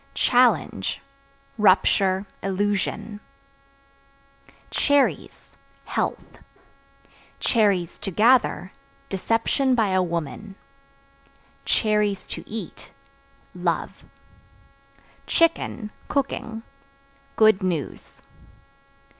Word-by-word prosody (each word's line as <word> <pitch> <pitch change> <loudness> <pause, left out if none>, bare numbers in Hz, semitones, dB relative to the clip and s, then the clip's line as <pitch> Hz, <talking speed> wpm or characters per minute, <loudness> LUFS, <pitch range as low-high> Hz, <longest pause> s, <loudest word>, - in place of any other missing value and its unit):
Challenge 220 - +2 0.6
Rupture, 190 -1 +3 0.2
illusion. 205 +2 -2 1.5
Cherries 285 -2 0 0.3
Health; - - -3 1.0
(to 195 -5 +1
gather) 220 -2 +3 0.4
deception 230 +6 +1
by 220 -4 +2
a 185 0 +2
woman; 170 +3 -4 1.1
(to 210 -3 0
eat) 220 +1 -8 0.6
love. - - -3 1.2
Chicken 320 -9 +1 0.2
(Cooking) 230 -5 -3 0.7
good 215 -2 +5
news. 170 -7 -4
210 Hz, 55 wpm, -24 LUFS, 185-225 Hz, 1.5 s, good